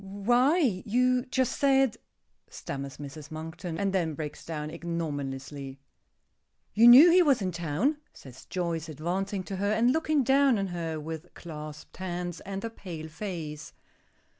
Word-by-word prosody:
"Why 240 - +2
you 250 +3 +2
just 260 -1 0
said 270 -4 +3 0.3
" - - -49 0.2
stammers 140 -1 -6
Mrs. 145 +1 -9
Monkton, 165 +2 -6
and 195 +1 0
then 165 -5 0
breaks 150 -1 -6
down 155 -2 -5
ignominiously. 145 -5 -5 0.9
"You 230 +3 +6
knew 275 +9 +10
he 365 +2 +6
was 285 -7 +4
in 190 -3 -2
town," 175 - 0
says 130 -2 -14
Joyce, 170 -3 -3
advancing 185 +6 -3
to 195 +1 -5
her, 200 +2 0
and 235 +4 +3
looking 310 -2 +1
down 270 -1 +4
on 195 - 0
her 165 -3 -3
with 160 +2 -7
clasped 150 -2 -9
hands 175 -2 -4
and 195 +2 -6
a 230 - -4
pale 165 -7 -8
face. 160 -4 -6
175 Hz, 150 wpm, -28 LUFS, 155-235 Hz, 0.9 s, knew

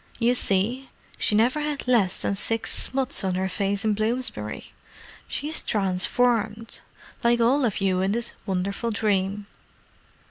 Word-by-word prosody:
"You 240 +1 +3
see, 240 +4 +1 0.3
she 210 - +2
never 240 +7 +3
had 295 -3 -3
less 215 -7 +2
than - - 0
six 225 +3 -1
smuts 265 -2 0
on 185 -1 0
her 190 +1 0
face 200 +2 -2
in 215 - +3
Bloomsbury. 230 +5 -3 0.6
She's 305 +3 +1
transformed, 215 +3 0 0.4
like 235 0 +3
all 255 +5 +3
of 210 -4 -1
you 185 -1 +1
in 195 +2 +1
this 235 +1 -3
wonderful 195 +4 -2
dream." 205 -2 0
220 Hz, 140 wpm, -25 LUFS, 195-245 Hz, 0.6 s, You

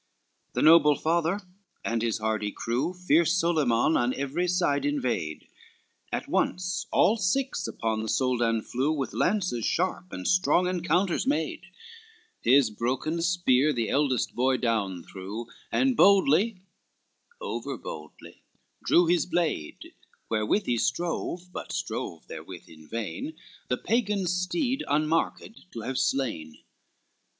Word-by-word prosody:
XXX - - -47
The - - -1
noble 155 -2 +7
father 170 +6 0 0.4
and 115 0 0
his 115 -1 0
hardy 110 -1 -1
crew 125 - -2
Fierce 175 -1 +2
Solyman 155 -5 +2
on 120 +1 +1
every 140 +6 -1
side 175 -6 +1
invade, 120 - -2 0.6
At - - -3
once 180 +2 -1
all 220 - +3
six 255 +7 0
upon 110 -1 -2
the 110 - -4
Soldan 120 -3 +1
flew, 130 +5 -1
With 140 -4 -2
lances 180 - 0
sharp, 185 +4 -1
and 90 - -5
strong 180 0 +3
encounters 180 +4 0
made, 290 +2 -1 0.8
His 130 -2 +4
broken 130 +9 -2
spear 160 -5 +3
the 115 -5 -1
eldest 135 -4 +1
boy 130 +1 +2
down 100 -8 -1
threw, 100 +5 -7 0.3
And 265 -1 +2
boldly, 200 +1 +4 0.8
over - - -4
boldly, - - -10 0.4
drew 175 - +4
his 170 0 +2
blade, 165 - -2 0.4
Wherewith 110 - +1
he 120 -1 0
strove, 175 +3 -2
but - - -6
strove 80 - -4
therewith - - -9
in 80 -1 -15
vain, 115 - -4 0.3
The - - 0
Pagan's 205 -6 0
steed, 255 - -1
unmarked, 160 +6 -1
to 115 - -5
have 130 +3 -2
slain. 95 - -1
155 Hz, 130 wpm, -27 LUFS, 115-180 Hz, 0.8 s, noble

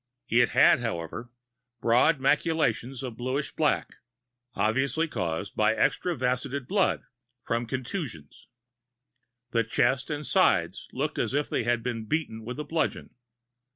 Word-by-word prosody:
It 120 +1 +4
had, - - +5
however, 115 0 -4 0.5
broad 125 +7 +4
maculations 135 -3 +1
of 120 -4 -6
bluish 130 +4 -2
black, 150 -2 0 0.6
obviously 135 +8 +1
caused 90 - -3
by 110 +1 +3
extravasated 130 0 0
blood 195 +2 +1 0.4
from 115 0 -1
contusions. 125 - -5 1.0
The 115 -1 +2
chest 130 +4 +1
and 150 0 -3
sides - - +2
looked - - -2
as - - 0
if 145 0 0
they - - 0
had 120 -1 +1
been 115 -2 -3
beaten 130 -7 -2
with 125 +5 -6
a - - -2
bludgeon. 160 +2 -2
125 Hz, 125 wpm, -27 LUFS, 115-145 Hz, 1.0 s, had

